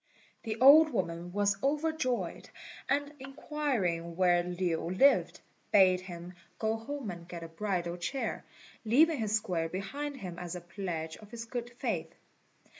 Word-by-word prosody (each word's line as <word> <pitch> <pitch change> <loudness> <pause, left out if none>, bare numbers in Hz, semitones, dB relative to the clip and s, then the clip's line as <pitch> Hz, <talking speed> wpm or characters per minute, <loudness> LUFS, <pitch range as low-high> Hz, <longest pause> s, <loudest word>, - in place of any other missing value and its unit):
The 220 -1 -4
old 300 +5 +9
woman 175 - -3
was 200 0 +1
overjoyed, 295 -3 -1 0.4
and 285 +1 0
inquiring 260 - -2
where 175 -1 +4
Lin 175 0 -2
lived, 275 +4 +4 0.3
bade 185 -3 +6
him 175 -1 -8 0.2
go 220 0 0
home 230 -1 -5
and 170 -1 -10
get 170 -2 -7
a - - -6
bridal 175 0 -2
chair, 255 +10 -3 0.4
leaving 290 +7 +4
his 215 -1 +1
square 175 -6 -1
behind 280 - -4
him 180 -7 -7
as 175 0 -5
a 180 - -6
pledge 175 -3 -5
of 210 - -14
his 230 0 -7
good 240 +1 -4
faith. - - -3
200 Hz, 145 wpm, -31 LUFS, 175-265 Hz, 0.4 s, old